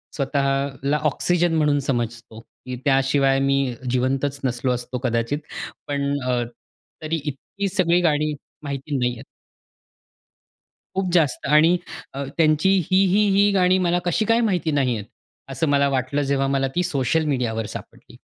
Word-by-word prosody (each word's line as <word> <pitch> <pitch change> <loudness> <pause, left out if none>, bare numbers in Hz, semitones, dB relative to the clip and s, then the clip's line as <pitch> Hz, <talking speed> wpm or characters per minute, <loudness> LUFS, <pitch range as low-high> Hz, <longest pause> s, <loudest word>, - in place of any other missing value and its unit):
स्वतःला 140 0 0
ऑक्सिजन 175 +3 +1
म्हणून 150 -2 +2
समजतो, 120 -2 -3
की 125 +2 -10
त्याशिवाय 135 0 +3
मी 135 -2 +1 0.2
जिवंतच 135 +3 0
नसलो 125 0 0
असतो 125 +1 -3
कदाचित. 120 +3 0 0.5
पण 140 -1 -1 0.2
अ, 125 -1 +1 0.6
तरी 160 +1 -2
इतकी 150 +8 -4
सगळी 175 -1 +3
गाणी 155 -2 +1 0.3
माहिती 140 0 -3
नाही 125 -1 +1
आहेत. 115 - -10 1.7
खूप 185 -2 -1
जास्त. 160 -7 +2
आणि 155 +5 +5 0.4
अ, 140 +1 -4
त्यांची 155 +2 +3 0.2
ही, 190 +1 +5
ही, 205 +3 +3
ही 205 +1 +5
गाणी 185 -1 +3
मला 175 +1 +2
कशी 195 +5 +1
काय 230 +2 +3
माहिती 180 -7 0
नाहीये, 125 -7 0 0.5
असं 155 +4 -1
मला 140 0 +3
वाटलं 135 +2 -1
जेव्हा 135 0 +1
मला 135 0 +1
ती 180 - +2
सोशल 145 +1 0
मीडियावर 120 -6 -1
सापडली. - - -11
140 Hz, 140 wpm, -22 LUFS, 130-165 Hz, 1.7 s, आणि